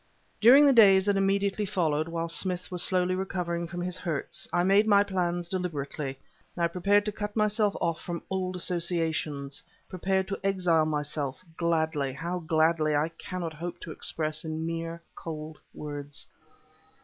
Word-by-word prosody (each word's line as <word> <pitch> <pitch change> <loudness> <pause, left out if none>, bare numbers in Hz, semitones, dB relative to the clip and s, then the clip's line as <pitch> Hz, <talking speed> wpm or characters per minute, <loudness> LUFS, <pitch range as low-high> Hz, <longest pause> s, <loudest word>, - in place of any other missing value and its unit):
During 265 +6 +8
the 280 - +6
days 195 -5 +7
that 205 -1 +2
immediately 195 +1 +1
followed, 160 -6 0
whilst 165 0 -2
Smith 180 -1 -3
was 180 -1 0
slowly 185 0 +2
recovering 180 -2 -2
from 175 +1 -5
his 180 0 -2
hurts, 165 -6 -3
I 175 - +2
made 200 +3 +4
my 200 -1 +6
plans 175 -3 -1
deliberately; 150 -6 -3 0.4
I 170 -1 +2
prepared 200 +4 +2
to 210 - -1
cut 205 0 -5
myself 210 -1 +2
off 165 -1 -1
from 170 -1 -5
old 185 -1 -2
associations 165 -5 -1 0.3
prepared 190 +1 0
to 195 - -3
exile 180 -5 +2
myself, 150 -1 -2
gladly; 160 -5 0
how 170 +6 -3
gladly 160 -1 +2
I 150 +2 +1
cannot 165 0 -6
hope 170 +3 -6
to 165 - -7
express 155 0 -1
in 160 0 -3
mere 165 0 -4
cold 155 -1 -7
words. 145 -1 -5
170 Hz, 155 wpm, -28 LUFS, 160-190 Hz, 0.4 s, During